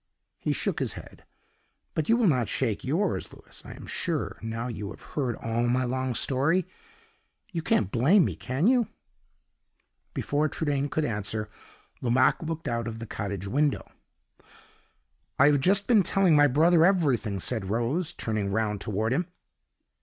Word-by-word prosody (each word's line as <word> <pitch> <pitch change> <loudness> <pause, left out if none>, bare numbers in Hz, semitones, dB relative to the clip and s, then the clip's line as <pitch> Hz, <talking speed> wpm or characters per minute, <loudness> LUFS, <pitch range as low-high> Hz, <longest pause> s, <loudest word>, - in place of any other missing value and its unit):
He - - -1
shook - - -1
his - - -2
head; - - -12 0.7
but 160 -1 -2
you 230 - +5
will 240 - +2
not 130 - +2
shake 115 -6 -1
yours, 170 +9 -1
Louis, - - -13
I - - -9
am - - -11
sure, - - -3
now 115 +2 -4
you 105 -4 -5
have - - -11
heard 130 -6 -1
all 115 +1 -1
my 125 +2 +2
long 130 0 -2
story? 145 +10 +1 0.9
You 170 -3 -2
can't 105 -10 +1
blame 160 - +4
me - - -2
can 130 +6 -2
you?" 245 -2 +4 1.3
Before 150 +2 0
Trudaine 145 -3 -1
could 150 +1 0
answer, 105 -1 -3 0.5
Lomaque 125 +1 +3
looked 165 0 -4
out 115 -1 -1
of 115 -1 -5
the 115 - -6
cottage 100 -3 -5
window. 145 +7 0 1.5
"I - - +6
have 145 - +3
just 195 +7 +3
been 230 -4 +5
telling 190 -2 +3
my 145 0 +6
brother 160 +5 +4
every 170 -7 +4
thing," 105 -3 -4
said 105 -1 -2
Rose, 120 - 0
turning 105 -3 -2
round 105 -1 -1
toward 110 +3 -1
him. 175 +5 0
130 Hz, 160 wpm, -27 LUFS, 115-160 Hz, 1.5 s, I